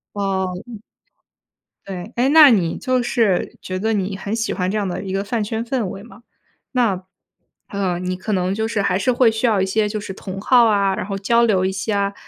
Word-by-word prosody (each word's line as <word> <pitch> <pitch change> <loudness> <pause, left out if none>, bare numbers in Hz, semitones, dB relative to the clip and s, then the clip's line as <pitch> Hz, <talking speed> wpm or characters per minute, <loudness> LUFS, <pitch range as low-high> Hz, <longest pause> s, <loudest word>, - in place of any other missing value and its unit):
哦。 190 -2 -1 0.2
嗯。 230 -3 -9 1.1
对。 190 +2 -7
诶， 250 +3 +2
那 300 -1 +9
你 180 -8 +2
就 255 -2 0
是 225 -6 0
觉 185 - -4
得 220 +3 0
你 195 -1 -1
很 200 +3 -3
喜 225 -1 -1
欢 180 -1 -1
这 215 - -1
样 205 -2 -1
的 180 - -4
一 190 - -5
个 195 0 -1
饭 220 +1 -2
圈 220 +2 -3
氛 240 -2 -1
围 195 - -7
嘛。 220 -1 -15 0.5
那， 225 -8 +1 0.7
呃， 190 -3 -2
你 185 0 -3
可 190 +4 -5
能 185 0 0
就 220 +1 -1
是 220 -3 -1
还 185 -2 +1
是 200 +6 +1
会 245 -1 +4
需 220 +3 -1
要 210 -4 +2
一 - - +2
些 210 +2 +1
就 215 0 -3
是 200 -1 -7
同 190 0 -7
好 240 +3 +5
啊， 200 -3 +2
然 - - -4
后 195 0 -4
交 235 +4 +2
流 190 -5 +2
一 190 - 0
下 200 +1 -1
200 Hz, 240 characters per minute, -20 LUFS, 190-225 Hz, 1.1 s, 那